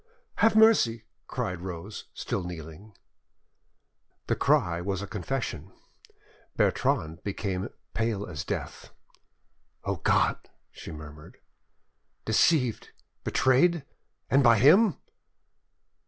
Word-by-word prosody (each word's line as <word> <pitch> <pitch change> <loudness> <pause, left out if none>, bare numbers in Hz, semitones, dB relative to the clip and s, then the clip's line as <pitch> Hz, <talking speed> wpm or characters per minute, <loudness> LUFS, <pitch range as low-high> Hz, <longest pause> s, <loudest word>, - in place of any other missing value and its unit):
"Have 225 +1 +4
mercy!" 195 - +4 0.2
cried 90 -1 -3
Rose, 95 +3 -7
still 95 - -3
kneeling. 85 +4 -9 1.3
The - - 0
cry 85 -1 +2
was 95 +1 -3
a - - -3
confession. 110 +6 -4 0.9
Bertrande 95 - 0
became 100 0 -3 0.2
pate 115 -1 0
as 75 -6 -5
death. - - -5 0.9
"O - - -2
God!" - - +1 0.2
she - - -10
murmured, 75 -1 -11 0.9
"deceived, 125 +1 +2 0.3
betrayed—and 140 0 +1
by 120 -2 +6
him!" 170 - +5
105 Hz, 90 wpm, -27 LUFS, 90-135 Hz, 1.3 s, by